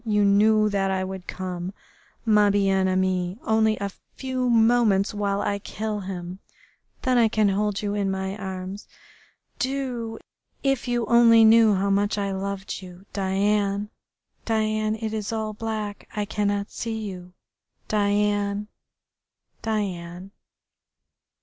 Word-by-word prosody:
You 210 -3 +2
knew 215 +2 +4
that 195 -1 0
I 190 -1 0
would 190 -1 -6
come, 185 0 -5 0.5
ma 210 -2 +5
bien 195 -1 +2
aimee, 185 0 0
only 220 0 +2
a 200 0 -3 0.2
few 260 -1 -2
moments 225 -4 +3
while 200 -1 -1
I 200 0 -1
kill 215 +1 -4
him, 185 -1 -6 0.6
then 255 -2 +3
I 230 - +5
can 215 -1 +2
hold 205 +1 0
you 205 -1 -1
in 200 -1 0
my 190 0 -2
arms. 190 0 -6 0.7
Dieu! 250 -4 -2 0.5
If 270 -2 0
you 240 -1 0 0.4
knew 220 -1 +6
how 195 +1 +1
much 205 +1 +1
I 200 -1 -1
loved 195 0 -4
you.... 180 +1 -12
Diane, 200 +1 0 0.5
Diane, 215 -1 0
it 220 0 -4
is 215 -1 -3
all 220 -1 -2
black. 215 -2 -5
I 210 -1 -1
cannot 205 0 -1
see 225 -1 -4
you, 185 -4 -7 0.5
Diane, 205 0 +1 0.9
Diane...." 190 -4 -3
205 Hz, 130 wpm, -25 LUFS, 195-220 Hz, 0.9 s, knew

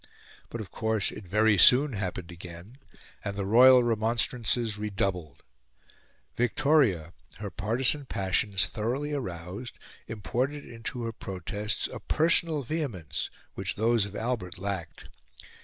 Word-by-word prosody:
But, 115 - -5
of 105 - -9
course, 110 -3 0
it 105 -3 -10
very 105 +1 +3
soon 130 - +7
happened 95 -3 -4
again, 85 +8 -11 0.4
and 100 - -3
the 100 - -2
royal 125 +4 +7
remonstrances 115 0 +1
redoubled. 95 -7 -3 0.9
Victoria, 120 - +2 0.2
her 100 -1 -6
partisan 130 +5 0
passions 95 -1 +1
thoroughly 130 +10 -2
aroused, 95 -2 -5 0.3
imported 125 +7 -2
into 115 +1 -6
her 115 - -2
protests 100 +1 -3
a - - -8
personal 160 -2 +2
vehemence 125 - -3 0.2
which - - -3
those 110 -1 +2
of 100 - -11
Albert 110 -6 -3
lacked. 95 -2 -5
110 Hz, 120 wpm, -28 LUFS, 95-125 Hz, 0.9 s, soon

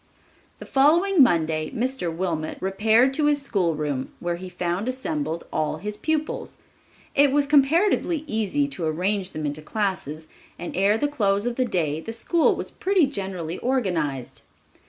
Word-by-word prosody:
The - - -10
following 335 +6 +4
Monday, 160 -8 +3
Mr. 250 -7 -2
Wilmot 165 -2 -3
repaired 220 +7 +3
to 295 +1 +1
his 295 -1 +3
schoolroom, 155 - -1
where 175 0 -2
he 185 +1 -8
found 180 +5 -2
assembled 260 - -3
all 155 - -1
his 210 +1 -5
pupils. 310 +6 -2 0.6
It 285 -1 +4
was 290 +1 +3
comparatively 310 +3 +3
easy 250 +4 0
to 180 -12 -4
arrange 185 +5 -1
them 155 -4 -5
into 145 +1 -3
classes 160 -5 -3 0.3
and 175 - -6
ere 200 +4 +3
the 290 - +1
close 205 -7 +1
of 245 -1 -1
the 255 - +1
day 160 -8 -1
the 225 - -6
school 320 +9 +2
was - - -6
pretty 380 -4 +2
generally 190 - -4
organized. 170 - -1
205 Hz, 155 wpm, -24 LUFS, 170-275 Hz, 0.6 s, following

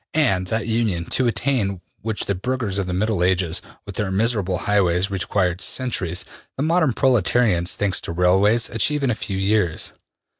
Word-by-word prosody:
And 100 -13 +2
that 110 +4 -1
union, 110 -7 0
to 130 - +2
attain 110 -4 0 0.2
which 110 -1 -3
the 100 - 0
burghers 105 0 -2
of 95 - -2
the - - -3
Middle 100 -1 0
Ages, 90 -2 +1 0.2
with 100 -2 -8
their 105 -2 -1
miserable 100 -2 +1
highways, 95 -2 +2
required 95 -1 -1
centuries, 100 -10 -1 0.3
the 135 - -1
modern 160 -4 +2
proletarians, 110 -7 +2
thanks 100 -2 +1
to - - -6
railways, 95 +6 +3
achieve 145 +6 +1
in 130 - +2
a - - +2
few 100 -3 -4
years. 95 -3 0
100 Hz, 165 wpm, -22 LUFS, 90-115 Hz, 0.3 s, railways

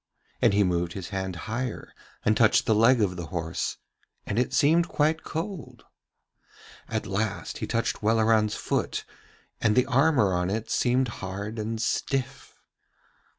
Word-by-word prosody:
And - - +4
he 105 - +4
moved 85 -2 0
his 95 -3 -6
hand 95 -2 -3
higher 120 +2 -4 0.3
and 110 - +4
touched 110 0 +4
the 110 - +3
leg 115 +3 +5
of 90 -3 0
the 85 -2 -5
horse, 80 0 -3 0.5
and 105 - -1
it 125 - 0
seemed 165 +3 +3
quite 155 +1 +1
cold. 160 - -6 1.0
At - - -2
last 95 -2 -3
he - - -3
touched 115 0 -1
Welleran's 110 0 +3
foot, - - -2 0.6
and 105 - +3
the 125 - +4
armour 135 -7 +3
on 90 +1 0
it 110 +3 -3
seemed 125 +1 +2
hard 100 +4 -5
and 110 +1 -3
stiff. 130 +3 -2
110 Hz, 150 wpm, -26 LUFS, 95-125 Hz, 1.0 s, leg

